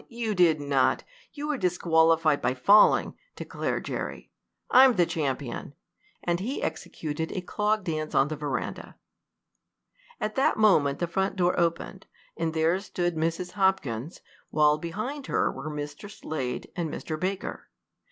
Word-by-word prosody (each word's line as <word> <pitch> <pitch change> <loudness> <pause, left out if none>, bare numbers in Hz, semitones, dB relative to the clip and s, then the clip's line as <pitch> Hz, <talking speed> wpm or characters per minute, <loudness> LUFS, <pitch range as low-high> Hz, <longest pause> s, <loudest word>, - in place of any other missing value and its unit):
You 230 -2 -2
did 170 -5 +4
not! 140 -2 +1 0.3
You 295 0 -5
were 290 -4 -1
disqualified 165 -3 +3
by 125 - 0
falling!" 200 +12 +5 0.2
declared - - -3
Jerry. - - -5 0.4
"I'm 255 -1 +7
the 175 -2 +4
champion!" 140 -5 -3 0.5
and 175 0 0
he 240 +9 -3
executed 160 +1 -4
a 185 - -3
clog 210 +3 0
dance 155 -3 -3
on 135 - +4
the 155 - -4
veranda. 145 -2 -4 1.2
At 215 0 -2
that 270 - +2
moment 155 -10 +4
the 175 - -1
front 190 +4 -1
door 180 -2 +2
opened, 170 +3 -2 0.3
and 165 -1 -2
there 165 +3 +2
stood 175 -3 -2
Mrs. 165 +3 -2
Hopkins, 165 - -1 0.3
while 150 0 +3
behind 215 - -5
her - - +1
were 155 - -6
Mr. 150 +6 -6
Slade 155 -10 -5
and 170 -3 -2
Mr. 155 +1 -5
Baker. 190 +2 -4
170 Hz, 140 wpm, -27 LUFS, 155-195 Hz, 1.2 s, I'm